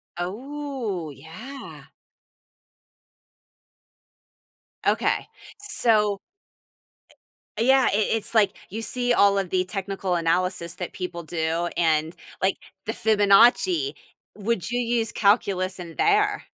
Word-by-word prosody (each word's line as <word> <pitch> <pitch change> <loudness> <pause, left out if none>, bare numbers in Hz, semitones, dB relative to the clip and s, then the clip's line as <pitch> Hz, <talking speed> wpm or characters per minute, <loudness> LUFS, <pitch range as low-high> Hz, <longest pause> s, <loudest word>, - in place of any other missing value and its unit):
Oh, 225 - -4
yeah. 220 - -11 3.0
Okay, - - +1 0.3
so 215 - +2 1.4
E 230 - +2
Yeah, 265 -1 +5
it - - +2
it 215 - +1
it's, 225 +1 -2
like, 205 -3 +3
you 220 +4 -5
see 245 +2 +1
all 200 -3 +4
of 190 -3 -2
the 185 -1 +1
technical 195 -1 -3
analysis 170 0 0
that 180 - -5
people 180 -2 -5
do, 165 +1 -2
and, 160 -1 +1 0.3
like, 190 0 +3 0.3
the 220 - -1
Fibonacci, 225 - +4 0.4
would 210 -2 -2
you 245 - 0
use 230 -2 0
calculus 195 -3 +1
in 170 -2 -8
there? 415 0 +2
200 Hz, 110 wpm, -24 LUFS, 180-240 Hz, 3.0 s, Yeah